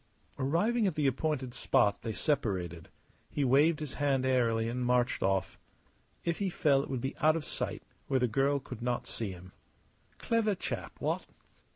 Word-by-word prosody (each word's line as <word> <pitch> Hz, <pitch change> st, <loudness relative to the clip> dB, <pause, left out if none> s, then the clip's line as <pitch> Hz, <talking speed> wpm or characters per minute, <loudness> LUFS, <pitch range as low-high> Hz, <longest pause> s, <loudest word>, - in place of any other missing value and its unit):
Arriving 205 Hz, -, +2 dB
at 180 Hz, -, -1 dB
the 150 Hz, -, 0 dB
appointed 135 Hz, -1 st, 0 dB
spot 100 Hz, -4 st, +2 dB
they 115 Hz, -, -3 dB
separated. 95 Hz, -, -1 dB, 0.4 s
He 145 Hz, -, -1 dB
waved 145 Hz, +5 st, +4 dB
his 150 Hz, -3 st, -4 dB
hand 135 Hz, -2 st, +1 dB
airily 115 Hz, -3 st, +2 dB
and 125 Hz, +2 st, -2 dB
marched 125 Hz, 0 st, +2 dB
off. 95 Hz, 0 st, 0 dB, 0.7 s
If 170 Hz, -1 st, 0 dB
he 200 Hz, -2 st, 0 dB
fell 145 Hz, -5 st, +3 dB
it -, -, -7 dB
would 130 Hz, -3 st, -2 dB
be 135 Hz, -, -3 dB
out 155 Hz, 0 st, +4 dB
of 165 Hz, -, -3 dB
sight, -, -, -4 dB, 0.2 s
where 135 Hz, -, +2 dB
the 125 Hz, -, +2 dB
girl 135 Hz, +5 st, +2 dB
could 125 Hz, -3 st, -8 dB
not 120 Hz, 0 st, -1 dB
see 110 Hz, -3 st, -4 dB
him. 90 Hz, 0 st, -11 dB, 0.7 s
Clever 225 Hz, -3 st, +1 dB
chap -, -, -4 dB
what? -, -, -1 dB
130 Hz, 175 wpm, -31 LUFS, 115-150 Hz, 0.7 s, waved